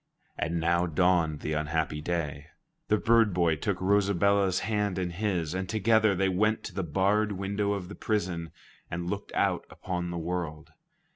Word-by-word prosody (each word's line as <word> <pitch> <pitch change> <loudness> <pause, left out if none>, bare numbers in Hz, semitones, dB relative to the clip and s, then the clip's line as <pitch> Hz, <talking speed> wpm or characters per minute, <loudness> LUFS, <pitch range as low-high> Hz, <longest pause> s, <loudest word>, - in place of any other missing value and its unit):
And 85 +1 -1
now 85 +2 +2
dawned 80 -2 +2
the 75 - -2
unhappy 75 0 -1
day. 75 -3 -3 0.4
The 105 - +3
bird 115 -3 +3
boy 85 -3 +3
took 95 +4 -2
Rosabella's 100 -1 +2
hand 105 -3 -1
in 90 -2 -1
his, 90 -4 -1
and 95 0 -3
together 110 -1 +3
they 95 +1 +2
went 105 +4 +1
to - - -7
the 95 - -2
barred 100 +6 +1
window 100 +1 -1
of 95 -3 -4
the 105 - -8
prison 90 -8 -2 0.4
and 85 +1 -3
looked 100 0 -5
out - - +1
upon 90 -1 -4
the 85 - -4
world. 85 -2 -4
90 Hz, 165 wpm, -28 LUFS, 85-100 Hz, 0.4 s, The